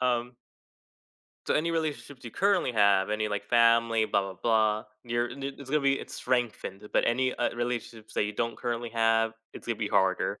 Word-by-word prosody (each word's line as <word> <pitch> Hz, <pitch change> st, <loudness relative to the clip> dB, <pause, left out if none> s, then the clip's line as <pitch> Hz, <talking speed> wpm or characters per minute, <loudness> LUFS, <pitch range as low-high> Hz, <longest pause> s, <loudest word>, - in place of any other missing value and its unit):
Um. 125 Hz, -1 st, 0 dB, 1.1 s
So, -, -, +1 dB
any 165 Hz, +2 st, +1 dB
relationships 150 Hz, -5 st, -3 dB
you 115 Hz, -, -6 dB
currently 195 Hz, -, +1 dB
have, 100 Hz, -2 st, +3 dB
any, 105 Hz, 0 st, 0 dB
like, 105 Hz, -1 st, -3 dB
family, 115 Hz, -1 st, +4 dB
blah, 100 Hz, -, +1 dB
blah, 95 Hz, -1 st, -5 dB
blah, 110 Hz, -2 st, +2 dB, 0.2 s
you're 120 Hz, 0 st, 0 dB
and 140 Hz, +3 st, -9 dB
i 135 Hz, -, -1 dB
it's 135 Hz, -1 st, -10 dB
gonna 150 Hz, 0 st, +2 dB
be 140 Hz, 0 st, +2 dB
it's -, -, -9 dB
strengthened. 115 Hz, -5 st, -2 dB
But -, -, +3 dB
any, 130 Hz, +2 st, +1 dB
uh, 120 Hz, -, -1 dB
relationships 120 Hz, -2 st, -4 dB
that -, -, +1 dB
you 105 Hz, -, -3 dB
don't 115 Hz, +2 st, -2 dB
currently 120 Hz, -1 st, -3 dB
have, 115 Hz, 0 st, +2 dB, 0.2 s
it's -, -, -10 dB
gonna 115 Hz, -, -1 dB
be 110 Hz, -2 st, -2 dB
harder 95 Hz, +1 st, +1 dB
115 Hz, 195 wpm, -28 LUFS, 110-125 Hz, 1.1 s, family